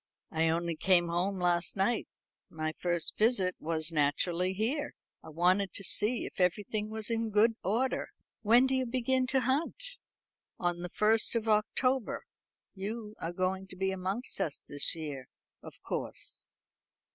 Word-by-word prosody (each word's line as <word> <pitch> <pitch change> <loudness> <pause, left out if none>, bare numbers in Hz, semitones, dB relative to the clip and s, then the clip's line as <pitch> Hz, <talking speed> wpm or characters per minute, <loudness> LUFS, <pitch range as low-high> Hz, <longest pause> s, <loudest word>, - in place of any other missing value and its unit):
"I 160 0 +2
only 170 0 0
came 175 +1 +3
home 180 +3 0
last 175 +1 +1
night. 215 +4 +1 0.4
My 155 0 -3
first 175 -2 -1
visit 210 -5 +3
was 160 0 0
naturally 165 +4 +1
here. 245 +10 -2 0.3
I - - -10
wanted 180 +5 +2
to 200 - -4
see 215 +5 +2
if - - -9
everything 210 +4 0
was 220 +1 -2
in 225 0 0
good 215 +2 +4
order." 235 +8 0 0.3
"When 235 +4 +6
do 265 - 0
you 260 -1 +1
begin 255 +1 +1
to 265 0 +2
hunt?" 330 - -1 0.6
"On 175 -1 -1
the 180 0 -5
first 220 +5 +2
of 225 -1 0
October. 230 +3 +1 0.5
You 210 +2 -5
are 165 - -3
going 185 +2 -1
to 185 - -9
be 190 +1 0
amongst 190 +4 -3
us 155 -7 -2
this 145 +2 +1
year, 145 -5 -6 0.3
of - - -11
course." - - -2
195 Hz, 155 wpm, -31 LUFS, 175-230 Hz, 0.6 s, When